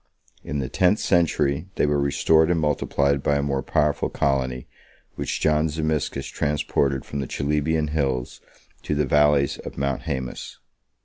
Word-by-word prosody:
22 - - -13
In 75 - -2
the 65 - -2
tenth 90 +7 +2
century, 85 -3 +1
they - - +2
were 75 -1 +1
restored 80 +3 +3
and 85 -1 +2
multiplied 70 -2 +1
by 70 - +1
a 70 - 0
more 70 -1 -1
powerful 75 +1 0
colony, 65 -3 -1 0.5
which - - -3
John 75 0 +2
Zimisces 80 -1 -1
23 70 - -6
transported 70 -1 -1
from 70 - -5
the 70 - -3
Chalybian 75 +2 -1
hills 65 -5 -2 0.4
to 75 - -2
the 75 0 +1
valleys 75 +1 +3
of - - -9
Mount 70 0 -1
Haemus. 65 -2 -5
75 Hz, 165 wpm, -23 LUFS, 70-75 Hz, 0.5 s, restored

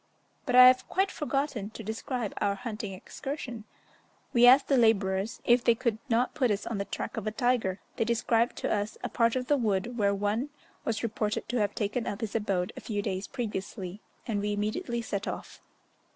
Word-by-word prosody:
But 250 - +1
I 250 0 +11
have 255 0 +5
quite 385 0 +1
forgotten 275 -8 -2
to 220 0 -9
describe 220 +1 -3
our 200 0 +2
hunting 215 -1 -5
excursion. 245 +3 -6 0.7
We 240 0 +7
asked 265 +3 +7
the 275 - +3
labourers 210 -3 +2
if 240 0 +4
they 235 - +5
could 230 -2 -1
not 240 +2 +2
put 255 -5 +1
us 205 -1 -1
on 220 -4 -3
the 200 - -1
track 200 - -5
of 215 -1 -3
a - - 0
tiger; 220 -5 +1 0.2
they - - +2
described 230 +1 +1
to - - -1
us 205 0 -2
a - - -2
part 230 0 +2
of 255 -1 -1
the 290 +2 +3
wood 225 0 -1
where 200 -1 +3
one 210 +7 -1 0.4
was 225 -1 -1
reported 215 -2 -1
to 245 - 0
have 205 -2 0
taken 220 +3 -1
up 205 - -4
his 220 -3 -3
abode 195 -5 -1
a - - -8
few 205 -2 -3
days 190 0 -3
previously, 205 -5 -5 0.2
and 215 -4 -1
we 205 0 -1
immediately 230 - -2
set 200 -2 -3
off. - - -6
225 Hz, 200 wpm, -29 LUFS, 205-245 Hz, 0.7 s, I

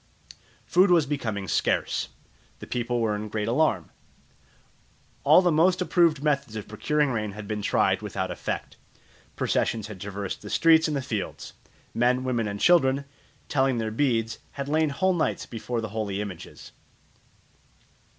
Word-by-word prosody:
Food 185 +3 +4
was 170 -4 +5
becoming 110 -9 -3
scarce. - - 0 0.5
The - - -9
people 120 -1 -2
were 110 -2 +1
in 105 +1 -5
great 105 0 -2
alarm. 115 - +1 1.3
All 185 - +6
the 175 - +3
most 180 +4 +3
approved 170 -5 +2
methods 140 -6 0
of 110 - -6
procuring 145 +7 0
rain 105 -4 -2
had 105 0 -8
been 105 0 -3
tried - - +2
without - - -3
effect. - - -5 0.6
Processions 110 -3 0
had 105 -4 -9
traversed 100 -1 -5
the 105 - -9
streets 160 +3 +5
and 150 -2 -1
the 135 - -3
fields. 110 -7 -5 0.4
Men, 125 +2 +2
women, 120 -4 -1
and 100 0 -4
children, 140 -4 +4 0.4
telling 135 -3 +1
their 110 -1 -2
beads, 115 -3 0
had 140 -1 -5
lain 155 +1 +2
whole 185 +7 +1
nights 170 - -1
before 115 0 -4
the 110 - -5
holy 105 -2 -3
images. 100 -5 -8
120 Hz, 150 wpm, -26 LUFS, 105-150 Hz, 1.3 s, All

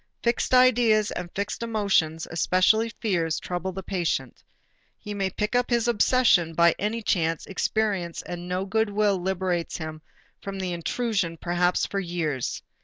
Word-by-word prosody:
Fixed 235 0 0
ideas 235 -4 +4
and 175 - -5
fixed 200 +3 -3
emotions, 200 -8 0
especially 185 +7 +3
fears, 175 -8 -1
trouble 180 +1 -4
the 190 +1 -7
patient. 170 -9 -2 0.5
He 210 - -7
may 195 -2 -1
pick 210 +5 -2
up 245 0 +2
his 240 -1 +1
obsession 230 -7 +3
by 170 0 +5
any 220 +3 -2
chance 165 -5 0
experience 195 -4 -1
and 175 0 -7
no 185 +1 -1
good 220 +2 +1
will 205 -2 +1
liberates 180 -2 -1
him 155 -1 -7 0.4
from 195 0 -6
the 185 -2 -3
intrusion 180 -1 -1
perhaps 175 +1 +1
for 200 - -3
years. 165 -8 -3
190 Hz, 150 wpm, -25 LUFS, 170-215 Hz, 0.5 s, by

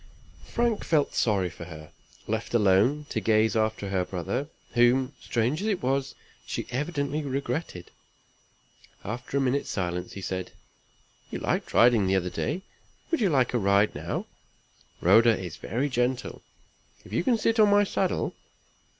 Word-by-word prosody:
Frank 235 -3 0
felt 150 -4 +1
sorry 95 -6 +1
for 85 - -9
her, 80 -3 -11 0.4
left - - -2
alone 110 +8 +3
to - - -1
gaze 110 -1 +3
after 110 -2 0
her 95 -2 +1
brother, 95 - -3 0.2
whom, 125 +3 +3
strange 125 +8 0
as 210 - -2
it 200 -8 -1
was, 135 +1 0 0.3
she - - -4
evidently 145 +2 -2
regretted. 135 - -4 1.1
After 125 +5 -4
a - - +2
minute's 135 +2 0
silence, 90 -2 -3
he 100 - -7
said: 95 -1 -4 0.8
"You - - -4
liked - - -2
riding 115 -5 +5
the 95 - +2
other 90 -1 0
day. 190 - -2 0.5
Would 330 - +1
you 200 - +3
like 130 -6 +2
a 120 - +2
ride 100 +1 +3
now? - - -4 0.8
Rhoda 115 +5 +6
is 90 -3 -6
very 130 +5 -2
gentle, 125 -1 -1 0.6
if - - -12
you - - +1
can 240 +2 +3
sit 225 +1 +1
on 210 -1 +7
my 205 0 +5
saddle. 200 - -1
120 Hz, 155 wpm, -27 LUFS, 100-145 Hz, 1.1 s, on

